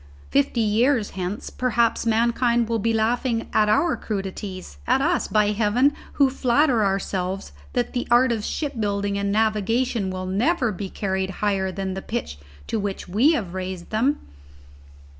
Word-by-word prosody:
Fifty 140 - +2
years 225 +2 +2
hence 190 +2 -4
perhaps 235 -2 +1
mankind 235 +1 +2
will 230 0 0
be 230 +3 +1
laughing 230 +1 0
at 210 -1 +3
our 295 +10 +3
crudities; 190 - -5
at - - +3
us, 340 +6 +1
by 210 -1 +2
heaven, 230 +7 +2 0.2
who 280 - +4
flatter 255 -2 +2
ourselves 195 - -2 0.2
that 120 - -1
the 245 - -2
art 240 +1 +5
of 220 -3 -1
ship 295 +4 -3
building 200 -1 -1
and 200 0 -1
navigation 220 +1 +1
will 185 0 -4
never 240 - +1
be 195 0 -5
carried 190 -1 -2 0.2
higher 190 -2 +1
than 190 0 -3
the 190 - -5
pitch 205 - -4 0.3
to 225 - -2
which 200 -1 -4
we 230 - +4
have 195 - -2
raised 185 -1 -5
them! 255 +7 +2
215 Hz, 160 wpm, -23 LUFS, 195-240 Hz, 0.3 s, art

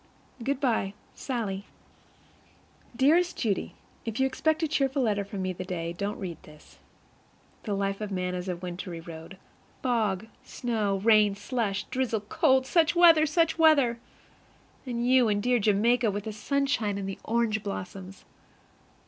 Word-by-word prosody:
Good 275 +2 -1
by, 225 -7 0 0.2
SALLIE. 210 -7 -4 1.3
Dearest 325 +8 +3
Judy: 210 -5 -2 0.3
If 225 +1 -4
you 265 - +4
expect 315 +4 0
a - - +2
cheerful 275 -3 +1
letter 205 -3 +1
from 200 -1 -5
me 185 0 -2
the 180 - -6
day, 170 -2 -4
don't 200 +4 -3
read 175 -5 -6
this. 150 0 -17 0.9
The 205 -3 -1
life 195 +1 -2
of 210 - -3
man 180 -2 -2
is 180 +1 -4
a 180 - -1
wintry 175 -1 -6
road. 165 +2 -10 0.5
Fog, 220 -6 0 0.2
snow, 215 -5 -1
rain, 215 -2 +5
slush, 205 -1 -2
drizzle, 255 -5 -2
cold 260 +5 +2
such 335 +3 +2
weather! 330 -3 +7
such 330 +1 +1
weather! 280 -7 +4 0.9
And 240 -1 -2
you 255 -3 +5
in 205 -1 +1
dear 245 +3 +2
Jamaica 220 +3 +3
with 205 0 -3
the 220 - -5
sunshine 250 -3 0
and 195 -1 -4
the 195 - -6
orange 225 -2 0
blossoms! 195 -1 -7
215 Hz, 150 wpm, -27 LUFS, 195-260 Hz, 1.3 s, weather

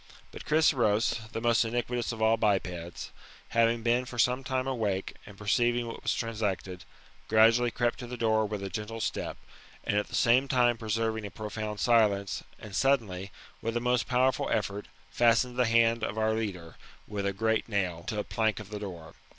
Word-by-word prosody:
But - - -10
Chryseros, 115 -7 +2
the - - -3
most 115 0 +3
iniquitous 120 +1 -2
of 110 -1 -3
all 110 +1 +5
bipeds, 90 -6 -2 0.4
having 115 0 +2
been 120 +2 +2
for 125 0 -9
some 125 +3 +2
time 130 0 -1
awake, 105 -8 -2
and 100 -1 -12
perceiving 120 +4 +1
what 115 - -7
was 115 - 0
transacted, 100 -5 -3 0.4
gradually 115 +2 +5
crept 120 0 -1
to 120 - -6
the 125 +1 -6
door 110 -2 +2
with 105 -1 -4
a 95 - -4
gentle 105 +4 -5
step, - - -3 0.5
and - - -1
at 105 - -3
the - - -6
same 125 +3 +4
time 120 -2 +3
preserving 110 0 -1
a - - -8
profound 105 +2 -5
i^ilence, 105 -4 +2 0.2
and 105 -3 -9
suddenly, 105 -9 +1 0.3
with 115 +1 -1
a - - +1
most 125 0 +1
powerful 130 0 +2
effort, 105 -1 -2 0.2
fastened 120 +1 +3
the 125 0 +3
band 115 0 +3
of 110 0 -2
our 110 0 +2
leader, 95 -7 -4 0.3
with 100 -1 -3
a - - +1
great 110 +3 0
nail, 90 -5 -1
to 110 - -3
a 105 - 0
plank 110 -2 0
of 105 -1 -10
the 105 - -4
door. 85 -5 -8
110 Hz, 185 wpm, -29 LUFS, 105-120 Hz, 0.5 s, all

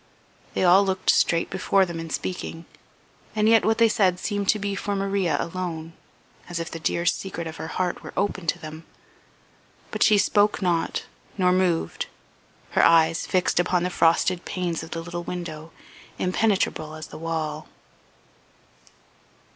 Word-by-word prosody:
They - - +1
all 185 +2 +6
looked 190 -1 +2
straight 170 0 +2
before 190 +1 +2
them 170 -2 -6
in 165 0 -6
speaking, 165 0 -4 0.7
and 215 0 +2
yet 225 -1 +6
what 220 0 +2
they 230 - +6
said 195 -5 +2
seemed 205 -1 -2
to 215 - +4
be 200 -1 -2
for 200 +1 -2
Maria 195 -5 0
alone, 165 -2 -4 0.6
as 175 -1 -3
if 165 - -5
the 165 - -6
dear 170 +1 -1
secret 175 -1 -1
of 160 0 -7
her - - -5
heart 180 +1 -2
were - - -9
open 190 -3 -1
to - - +1
them. 155 +1 -9 1.1
But - - -5
she 215 - +6
spoke 205 +1 +3
not, 175 -4 0 0.3
nor 180 -2 +3
moved, 180 -2 0 0.6
her - - +3
eyes 165 0 +4
fixed 185 -2 +1
upon 175 0 +2
the 180 - -1
frosted 170 +1 +2
panes 175 -3 -3
of 160 - -9
the 165 - -4
little 175 0 -5
window, 170 -3 -6 0.5
impenetrable 185 -5 0
as 155 0 -7
the - - -10
wall. 155 -2 -3
175 Hz, 160 wpm, -24 LUFS, 165-195 Hz, 1.1 s, all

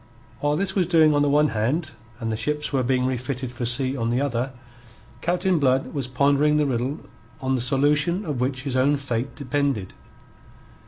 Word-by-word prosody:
While 145 0 +1
this 190 0 -1
was 185 -4 +1
doing 160 -3 +5
on 145 - +2
the 145 - +3
one 150 +1 +4
hand 125 +10 -1 0.3
and 115 -2 -2
the - - -1
ships 150 +5 -2
were 135 - +2
being 125 0 +1
refitted 130 0 -3
for 120 -1 -3
sea 130 +2 +1
on 115 -3 -1
the 120 +2 +1
other, 130 -2 -1 0.7
Captain 180 0 +1
Blood 135 -1 +1
was 140 -4 -2
pondering 140 +3 +3
the 150 - +2
riddle 130 +2 -2 0.4
on 130 -1 -1
the 130 - 0
solution 145 - +1
of 145 -6 -3
which 130 0 -1
his 135 -3 -3
own 140 +3 +3
fate 130 -2 -3
depended. 140 -7 -1
140 Hz, 190 wpm, -24 LUFS, 125-150 Hz, 0.7 s, doing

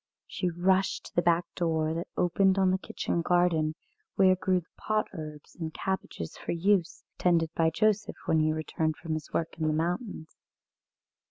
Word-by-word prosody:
She 180 - -2
rushed 185 +3 +1
to - - -12
the 175 - +4
back 170 0 +3
door 160 -2 0
that 170 +1 -3
opened 190 +2 +3
on 190 -1 +4
a 190 - 0
kitchen 170 - -2
garden, 165 -3 +2 0.4
where 185 -1 +5
grew 185 0 +1
the 165 - -28
pot 215 0 0
herbs 155 -4 -8
and 160 -2 -4
cabbages 190 - -4
for - - -4
use, 180 0 +1 0.2
tended 165 -2 +2
by 165 -1 +3
Joseph 210 +5 +1
when 160 - +3
he 155 0 +3
returned 155 0 -1
from 165 -2 -4
his 155 -2 -5
work 165 0 -2
in 155 - +1
the 155 - +2
mountains. 170 - -3
170 Hz, 175 wpm, -29 LUFS, 160-185 Hz, 0.4 s, where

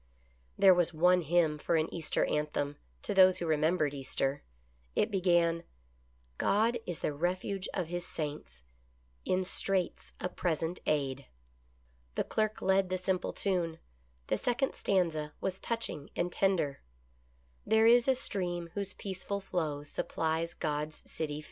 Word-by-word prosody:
There 190 -1 +8
was 175 -2 +1
one 180 +3 +5
hymn 160 -1 +2
for 170 - 0
an 160 0 +2
Easter 165 -3 0
anthem, 145 -1 -1 0.3
to - - -1
those 185 -1 +7
who 175 - -2
remembered 155 -1 +2
Easter. 135 0 -2 0.5
It 215 - +2
began: 175 -3 +3 0.4
" - - -36 0.3
God 230 +4 +2
is 175 -2 -4
the 150 - 0
refuge 185 +5 -2
of 180 -4 -2
His 175 0 -3
saints, 145 - -6 0.6
In 185 0 +1
straits 185 0 -1
a - - -1
present 170 -1 -2
aid." 140 -2 0 0.9
The - - +1
clerk 215 0 -1
led 190 -1 +3
the 185 - 0
simple 185 0 -1
tune. 175 -5 0 0.5
The 110 - 0
second 250 - 0
stanza 160 -6 0
was 190 0 -2
touching 230 -11 -3
and 175 +1 0
tender: 175 -9 +1 0.4
" 60 0 -36
There 220 0 +5
is 240 +2 +6
a 265 - +5
stream 175 -7 -2
whose 200 0 -4
peaceful 195 +1 -4
flow 155 -7 -2
Supplies 160 +3 -2
God's 150 -1 -3
city 150 -2 -4
fair." - - -4
175 Hz, 150 wpm, -32 LUFS, 150-190 Hz, 0.9 s, There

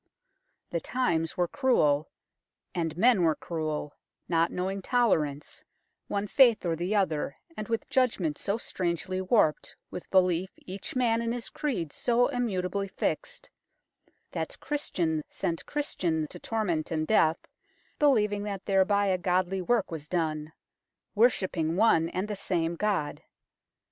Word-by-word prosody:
The - - 0
times 170 -11 -1
were 175 -1 +2
cruel, 160 - +2 0.6
and 165 -2 -2
men 230 0 +5
were 160 -2 +3
cruel, 155 -3 -4 0.3
not 165 -1 +2
knowing 190 +2 -2
tolerance, 160 - 0 0.4
one 200 0 -1
faith 235 -2 +5
or 165 -1 +1
the 175 +6 -1
other, 160 -8 0 0.2
and 215 - -5
with 230 -1 -2
judg 255 -4 +2
ment 155 -5 -2
so 200 +2 -1
strangely 185 -2 -2
warped, 185 -5 +2 0.2
with 180 - -7
belief 185 -1 +3
each 190 +6 -7
man 230 -2 +2
in 230 0 -1
his 240 -1 -5
creed 195 - -3
so 245 +1 +2
immutably 200 -6 -1
fixed, - - -3 0.8
that - - -4
Christian 170 - -1
sent 165 -1 -3
Christian 175 - -1
to - - -8
torment 185 -9 -1
and 155 -1 -1
death 160 -4 +4 0.6
believing 210 -8 +3
that 200 -2 -5
thereby 200 +1 +3
a 185 -2 +1
godly 185 +1 +1
work 220 +1 +1
was 155 -2 -6
done, 155 -3 -2 0.6
worshipping 185 -8 +2
one 170 -6 +4
and 185 +4 -2
the 210 - -3
same 170 -3 -1
God. 195 -6 -1
185 Hz, 140 wpm, -28 LUFS, 165-220 Hz, 0.8 s, men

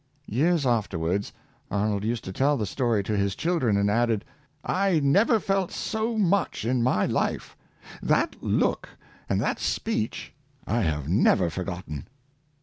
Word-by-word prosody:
Years 155 +6 +1
afterwards, 100 -5 0 0.4
Arnold 105 0 0
used 115 +1 -2
to 95 - -6
tell 140 +7 +2
the 110 - -1
story 115 0 0
to 105 +2 -2
his 100 -1 0
children, 155 - +1
and 100 0 +2
added, 115 0 +1 0.3
" 150 0 -40 0.2
I 175 -5 +3
never 200 - +4
felt 195 -2 0
so 220 +1 -2
much 200 - +1
in 125 +1 +1
my 115 -5 +2
life - - -1 0.2
— - - -16
that - - +2
look - - 0 0.4
and - - +1
that - - -1
speech 110 +1 -2 0.3
I 115 +1 0
have 75 -6 -1
never 90 0 +3
forgotten." 90 -5 -5
115 Hz, 150 wpm, -26 LUFS, 100-150 Hz, 0.4 s, never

